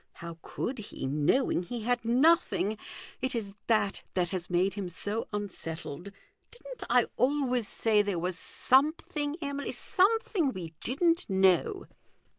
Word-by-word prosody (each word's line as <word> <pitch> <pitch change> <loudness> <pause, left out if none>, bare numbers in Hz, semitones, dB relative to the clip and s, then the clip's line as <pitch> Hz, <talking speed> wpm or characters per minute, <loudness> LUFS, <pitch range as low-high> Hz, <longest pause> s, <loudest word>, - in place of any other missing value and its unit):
How 170 -1 -9
could 255 0 -4
he, 210 - -6
knowing 150 - +2
he 235 +6 -5
had 245 +1 +1
nothing? 250 - +3 0.5
It 260 0 -1
is 205 -4 -3
that 215 -3 +2
that 180 -2 +1
has 180 -1 -4
made 180 +2 +2
him 195 -3 -4
so 205 +6 -2
unsettled. 180 -4 -5 0.4
Didn't - - -9
I - - +5
always 255 -4 +1
say 215 -2 +2
there 200 -3 -1
was 180 +2 -2
something, 290 - +1
Emily, 280 0 -3
something 400 - +2
we 170 -3 -7
didn't 335 +6 +1
know 190 -2 +3
220 Hz, 135 wpm, -29 LUFS, 185-280 Hz, 0.5 s, I